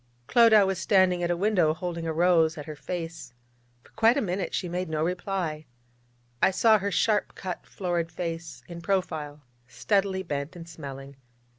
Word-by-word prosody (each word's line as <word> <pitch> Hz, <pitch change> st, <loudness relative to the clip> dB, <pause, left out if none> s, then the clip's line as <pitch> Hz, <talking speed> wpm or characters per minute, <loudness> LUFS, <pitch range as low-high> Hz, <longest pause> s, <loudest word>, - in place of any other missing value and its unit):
Clodagh 220 Hz, -, +6 dB
was 190 Hz, -1 st, -1 dB
standing 185 Hz, -2 st, +3 dB
at 175 Hz, -, 0 dB
a 175 Hz, -, 0 dB
window 180 Hz, -5 st, +2 dB
holding 170 Hz, -1 st, -4 dB
a -, -, 0 dB
rose 165 Hz, -1 st, +3 dB
at 150 Hz, -, -6 dB
her 155 Hz, -, -7 dB
face. 165 Hz, -4 st, -6 dB, 0.5 s
For -, -, -22 dB
quite 225 Hz, +4 st, +3 dB
a -, -, +3 dB
minute 185 Hz, -1 st, -2 dB
she 180 Hz, -, -2 dB
made 180 Hz, 0 st, -3 dB
no 155 Hz, 0 st, -1 dB
reply. 175 Hz, -3 st, -3 dB, 0.7 s
I -, -, +6 dB
saw 215 Hz, +3 st, +4 dB
her 200 Hz, +1 st, -1 dB
sharp 210 Hz, +2 st, +1 dB
cut, 185 Hz, -2 st, -6 dB
florid 175 Hz, -3 st, -2 dB
face 165 Hz, -1 st, -5 dB
in 170 Hz, -1 st, -8 dB
profile, 160 Hz, -6 st, -2 dB, 0.2 s
steadily 190 Hz, -, 0 dB
bent 145 Hz, 0 st, -4 dB
and 170 Hz, -1 st, -9 dB
smelling. 140 Hz, -4 st, -9 dB
175 Hz, 170 wpm, -27 LUFS, 160-190 Hz, 0.7 s, Clodagh